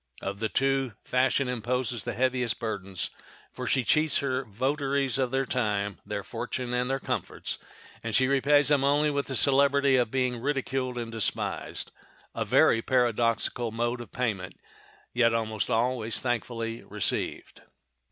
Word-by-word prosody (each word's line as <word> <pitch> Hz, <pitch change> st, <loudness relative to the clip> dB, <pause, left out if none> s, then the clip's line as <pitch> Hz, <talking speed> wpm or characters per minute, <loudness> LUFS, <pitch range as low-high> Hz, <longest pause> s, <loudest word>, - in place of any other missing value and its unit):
Of 100 Hz, +1 st, -4 dB
the 110 Hz, 0 st, -1 dB
two, 135 Hz, -3 st, +1 dB
fashion 130 Hz, +1 st, +2 dB
imposes 125 Hz, -2 st, -1 dB
the -, -, -2 dB
heaviest 125 Hz, -1 st, +1 dB
burdens, 100 Hz, -5 st, -3 dB, 0.4 s
for -, -, -6 dB
she 130 Hz, -, +2 dB
cheats 155 Hz, +5 st, +3 dB
her 130 Hz, -1 st, -1 dB
votaries 135 Hz, +4 st, 0 dB
of 130 Hz, -2 st, +1 dB
their 135 Hz, +1 st, 0 dB
time, 105 Hz, -7 st, -1 dB
their -, -, -4 dB
fortune, 125 Hz, -1 st, -4 dB
and 125 Hz, +1 st, 0 dB
their 135 Hz, -, +1 dB
comforts, -, -, -3 dB, 0.4 s
and 115 Hz, -2 st, -3 dB
she 130 Hz, -, +5 dB
repays 140 Hz, +2 st, +4 dB
them 145 Hz, -2 st, +3 dB
only 145 Hz, +2 st, +3 dB
with 140 Hz, -1 st, -1 dB
the 135 Hz, -, -3 dB
celebrity 140 Hz, +1 st, +4 dB
of 120 Hz, -3 st, +2 dB
being 125 Hz, -1 st, 0 dB
ridiculed 135 Hz, -2 st, -1 dB
and 115 Hz, -1 st, -4 dB
despised—a 115 Hz, -2 st, -4 dB
very 115 Hz, -, +4 dB
paradoxical 120 Hz, -1 st, +1 dB
mode 120 Hz, +2 st, -1 dB
of 120 Hz, -, -10 dB
payment, 105 Hz, -7 st, -2 dB, 0.6 s
yet 115 Hz, -1 st, +3 dB
always 110 Hz, -2 st, -1 dB
most 115 Hz, -1 st, +1 dB
thankfully 115 Hz, -2 st, -2 dB
received. 105 Hz, 0 st, -3 dB
125 Hz, 145 wpm, -28 LUFS, 115-135 Hz, 0.6 s, she